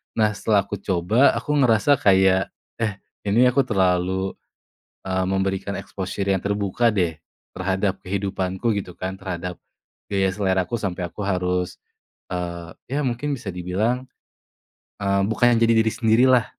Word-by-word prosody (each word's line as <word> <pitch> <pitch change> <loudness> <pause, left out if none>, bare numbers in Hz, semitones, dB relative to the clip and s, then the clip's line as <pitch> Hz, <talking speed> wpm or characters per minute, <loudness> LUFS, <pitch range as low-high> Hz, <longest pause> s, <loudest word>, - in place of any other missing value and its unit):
Nah 110 -1 +3
setelah 100 -1 +2
aku 100 0 -6
coba 100 +8 +3
aku 150 - -3
ngerasa 125 +4 +4
kayak, 95 -1 +4 0.3
"Eh, 110 -3 0 0.3
ini 115 +5 +5
aku 135 +2 +3
terlalu, 95 -1 +1 0.8
eee, 95 0 0
memberikan 95 +1 -1
exposure 95 0 -4
yang 95 -2 +1
terbuka 100 +3 +1
deh 85 -5 0 0.4
terhadap 95 +1 -1
kehidupanku," 95 +2 -2
gitu 90 -3 -7
kan 95 +2 -4
terhadap, 90 -2 -5 0.5
gaya 95 -1 +2
seleraku 95 +1 0
sampai 90 -3 -3
aku 105 - -7
harus, 90 -1 -1 0.5
eee, 85 -1 -4 0.3
ya - - +1
mungkin 125 +4 -2
bisa 110 -5 -5
dibilang, 105 +9 -1 1.0
eee, 100 -1 +1
bukannya 120 0 +3
jadi 115 0 +5
diri 110 - +2
sendirilah 120 +1 +4
95 Hz, 135 wpm, -23 LUFS, 95-110 Hz, 1.0 s, ini